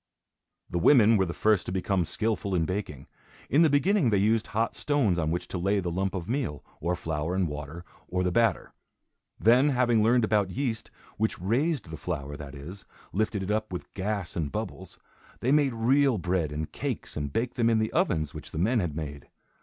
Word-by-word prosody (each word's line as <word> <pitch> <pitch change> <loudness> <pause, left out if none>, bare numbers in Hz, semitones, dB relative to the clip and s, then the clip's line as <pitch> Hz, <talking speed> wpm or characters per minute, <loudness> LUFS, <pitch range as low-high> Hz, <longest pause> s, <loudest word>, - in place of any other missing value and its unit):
The 85 - -2
women 115 - +6
were 95 -3 +2
the - - -3
first 105 -3 +2
to - - -2
become 95 -1 0
skilful 105 0 -1
in 85 -2 +2
baking. 90 -7 -4 0.5
In 145 - +5
the 165 - +6
beginning 150 - +3
they 105 - +3
used 110 +3 +2
hot 115 +2 -1
stones 125 -12 +1
on 80 -2 0
which 85 +2 -2
to 90 - -3
lay 100 +3 +1
the 90 -2 -2
lump 95 +3 -1
of 90 -2 -4
meal, 120 - -2
or 85 +3 -1
flour 80 0 -3
and 95 -2 +1
water, 75 +3 -7 0.2
or 90 0 -1
the 90 - +1
batter. 115 0 +1 0.7
Then 125 +6 +5
having 120 -4 +3
learned 120 +2 +4
about 105 -3 +2
yeast, 115 +1 -3 0.3
which 110 +1 -1
"raised" 120 - 0
the 80 - -6
flour, 75 -5 -4
that 70 0 -9
is, 90 +8 -9 0.3
lifted 105 0 0
it 95 - -2
up, 110 -1 -1
with 90 - -7
gas 100 -2 -3
and 75 -5 -2
bubbles, - - -6 0.4
they 125 - 0
made 145 -3 +3
real 130 +2 +3
bread 90 -4 -1
and 75 +1 -4
cakes - - -4
and 75 -2 -3
baked 120 - -2
them 115 -2 +2
in 115 - +3
the 110 0 -1
ovens 80 -4 +1
which - - -9
the - - -8
men 110 +8 +2
had 85 -7 -2
made. 75 -2 -6
100 Hz, 205 wpm, -27 LUFS, 85-115 Hz, 0.7 s, women